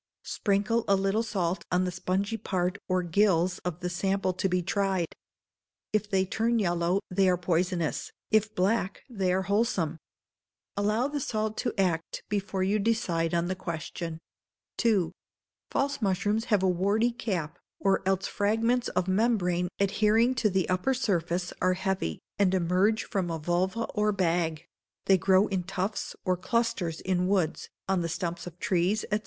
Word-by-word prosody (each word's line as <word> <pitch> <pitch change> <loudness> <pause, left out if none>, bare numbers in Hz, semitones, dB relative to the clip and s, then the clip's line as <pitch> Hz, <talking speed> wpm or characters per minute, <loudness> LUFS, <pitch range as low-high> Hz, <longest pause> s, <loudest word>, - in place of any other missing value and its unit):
Sprinkle 215 +3 0
a 200 - +5
little 195 +3 +1
salt 190 -6 -1
on 180 0 +3
the 180 - -1
spongy 190 +4 -1
part 185 -3 -1
or 185 -1 +1
gills 175 0 +2
of 180 -1 -5
the 180 - -1
sample 190 +1 0
to 185 +1 -1
be 180 0 +1
tried. 190 -2 0 0.8
If 210 -1 +1
they 190 -1 +2
turn 230 +5 +1
yellow, 175 -1 +1
they 190 +1 +3
are 180 - +3
poisonous, 175 -1 -1 0.2
if 215 0 +2
black, 195 +1 0
they 190 -5 0
are 190 +1 +1
wholesome. 195 -6 0 0.8
Allow 210 +5 +1
the 290 0 -3
salt 215 -4 -2
to 240 - -1
act, 170 -4 0
before 200 -2 -1
you 200 +3 +2
decide 175 -6 0
on 170 0 +1
the 185 - 0
question. 165 -1 -5 0.7
ii. 200 -8 +3 0.6
False 280 -1 -1
mushrooms 205 +3 +1
have 210 -5 +2
a - - +4
warty 200 +6 +2
cap, 175 -9 -3 0.2
or 195 -1 +2
else 195 0 +1
fragments 225 +4 +1
of 180 0 -1
membrane, 185 -4 +2
adhering 215 +5 +3
to 235 -4 +1
the 190 -2 +1
upper 185 +9 +1
surface, 180 -6 -1
are 185 0 +3
heavy, 190 - -1 0.2
and 190 -2 +3
emerge 185 +5 +2
from 185 -3 -2
a 165 - -2
vulva 180 +7 0
or 210 0 +2
bag; 170 -4 0 0.4
they 190 -1 +5
grow 190 +3 +4
in 190 -2 0
tufts 190 +3 -3
or 185 -1 +2
clusters 205 -4 -1
in 180 -1 0
woods, 185 -5 0 0.2
on 190 -2 +1
the 170 - -2
stumps 170 +1 -3
of 175 -1 -9
trees, 185 +3 +1
&c. 210 - +3
190 Hz, 160 wpm, -28 LUFS, 180-210 Hz, 0.8 s, a